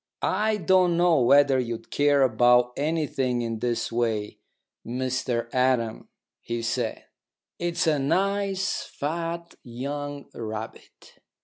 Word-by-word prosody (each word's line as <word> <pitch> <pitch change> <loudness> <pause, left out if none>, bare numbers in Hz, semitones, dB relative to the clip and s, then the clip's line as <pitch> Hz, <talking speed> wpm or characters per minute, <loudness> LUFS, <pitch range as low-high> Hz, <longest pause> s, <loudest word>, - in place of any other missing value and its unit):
"I 215 0 +1
don't 180 -2 +3
know 175 -3 +4
whether 140 +1 +5
you'd 120 -2 -5
care 145 -1 +3
about 125 0 +4
anything 140 -5 -1
in 115 -1 -3
this 120 0 -1
way, 115 -3 -1 0.4
Mr 125 -1 -2
Adam," 125 -3 0 0.3
he 115 0 -4
said. 115 - -2 0.5
"It's 175 +1 0
a 155 -3 +2
nice 195 +5 0
fat 170 +3 -4
young 140 +4 -5
rabbit." 110 -1 -8
135 Hz, 110 wpm, -25 LUFS, 120-165 Hz, 0.5 s, whether